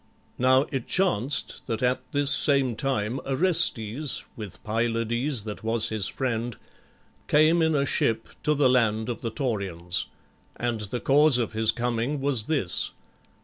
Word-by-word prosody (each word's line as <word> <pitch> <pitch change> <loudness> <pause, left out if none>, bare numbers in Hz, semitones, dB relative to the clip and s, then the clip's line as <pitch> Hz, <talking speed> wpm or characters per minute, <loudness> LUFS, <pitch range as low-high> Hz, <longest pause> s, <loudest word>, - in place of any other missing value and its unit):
Now 130 +2 +4
it 135 -5 -4
chanced 150 - 0
that 115 0 -3
at 125 +1 +1
this 145 0 +4
same 140 -5 +3
time 125 -1 -2
Orestes, 140 - +1
with 105 -4 -8
Pylades 115 +3 -1
that 105 0 -8
was 115 0 +1
his 110 -3 -1
friend, 120 -3 -3 0.7
came 155 +3 +4
in 160 -1 +2
a 140 -1 +1
ship 115 -4 0
to 150 - +1
the 140 -2 +3
land 115 -3 +1
of 120 - -5
the 115 - -3
Taurians. 100 -8 -3 0.5
And 120 -2 -3
the 105 +4 -4
cause 145 0 +4
of 115 -3 -2
his 110 0 +3
coming 120 +4 -2
was 135 -5 +3
this. 135 - -1
120 Hz, 145 wpm, -25 LUFS, 110-140 Hz, 0.7 s, Now